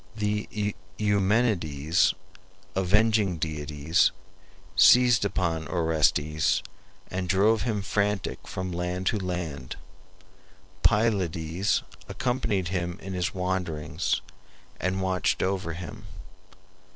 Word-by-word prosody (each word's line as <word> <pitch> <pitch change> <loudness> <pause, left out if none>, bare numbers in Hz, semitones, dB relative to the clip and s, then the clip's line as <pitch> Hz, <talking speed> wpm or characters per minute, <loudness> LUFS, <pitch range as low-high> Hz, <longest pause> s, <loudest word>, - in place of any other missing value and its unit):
The 105 -1 -2 0.2
Eumenides, 95 -6 +2 0.6
avenging 100 0 +3
deities, 75 0 +1 0.7
seized 125 -3 +6
upon 85 -6 -1
Orestes, 80 -2 +1 0.5
and 90 -1 -3
drove 105 +4 +3
him 105 -2 -1
frantic 100 0 -1
from 95 -1 -4
land 90 +1 -3
to 105 - +1
land. 85 -8 -4 1.1
Pylades 95 -4 +1 0.3
accompanied 120 -8 -1
him 90 -1 -2
in 95 0 -7
his 90 +1 -2
wanderings 90 -2 -1 0.6
and 95 +1 -1
watched 95 -1 +1
over 95 -3 -1
him. 85 -1 -8
95 Hz, 90 wpm, -27 LUFS, 85-105 Hz, 1.1 s, seized